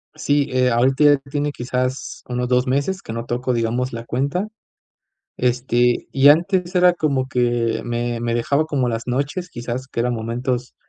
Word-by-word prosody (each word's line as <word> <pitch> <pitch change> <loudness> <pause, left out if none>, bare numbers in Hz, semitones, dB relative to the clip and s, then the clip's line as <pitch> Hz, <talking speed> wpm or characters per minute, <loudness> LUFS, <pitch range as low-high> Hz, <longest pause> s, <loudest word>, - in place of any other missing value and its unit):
Sí, 145 -2 +1
eh, 130 0 +2
ahorita 130 +5 +2
ya 145 -1 +6
tiene 145 +1 -1
quizás 130 0 -3
unos 125 0 -2
2 125 +1 +2
meses 140 +9 -1
que 115 - -6
no 115 +1 -4
tocó, 125 +1 -1
digamos, 120 +2 -1
la 115 0 -6
cuenta. 140 - -1 0.9
Este, 125 -1 +1
y 135 +1 +6
antes 175 +3 +2
era 180 0 +5
como 140 -6 0
que 120 -3 0
me 120 0 -2
me 120 0 -1
dejaba 140 +6 +1
como 135 -5 0
las 115 -1 -3
noches, 140 +8 -2
quizás, 120 +2 -5
que 115 - -5
eran 125 +1 +1
momentos 120 +2 -3
125 Hz, 170 wpm, -21 LUFS, 120-145 Hz, 0.9 s, ya